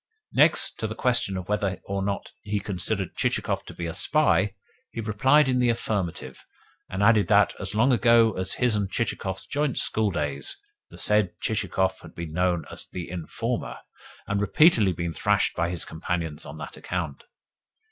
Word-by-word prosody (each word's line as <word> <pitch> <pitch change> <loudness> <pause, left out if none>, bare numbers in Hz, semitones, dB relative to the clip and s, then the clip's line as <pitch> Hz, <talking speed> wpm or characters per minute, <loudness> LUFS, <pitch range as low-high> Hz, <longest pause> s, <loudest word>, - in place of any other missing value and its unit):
Next, - - +3
to - - -1
the - - -6
question 125 -6 +1
of 90 -1 -6
whether 100 -2 -1
or 100 0 -2
not 100 0 -3
he 105 0 -2
considered 100 0 -2
Chichikov - - -1
to - - -9
be 85 - -4
a 80 - -3
spy, 105 - +2 0.3
he - - -7
replied 130 +7 +3
in 130 -1 +2
the 125 -1 +3
affirmative, 95 - -3 0.5
and 95 +2 -2
added 105 -1 +5
that, 105 -1 +4
as 95 +2 -4
long 120 +5 +4
ago 115 -2 +5
as 95 0 -1
his 125 -3 +2
and 100 -2 -1
Chichikov's 95 -4 -3
joint 145 -2 -1
schooldays, 75 -10 -1 0.3
the - - -13
said 105 -4 +2
Chichikov 95 -3 0
had - - -14
been 85 -2 -6
known 90 -1 +1
as - - -6
"The 90 -2 -6
Informer," 85 -3 -3 0.5
and 100 0 -1
repeatedly 115 - +4
been 85 -1 -3
thrashed 105 +1 +1
by 85 0 0
his 85 -2 -1
companions 80 -1 -4
on - - -8
that - - -8
account. 85 -6 -4
100 Hz, 170 wpm, -26 LUFS, 90-110 Hz, 0.5 s, added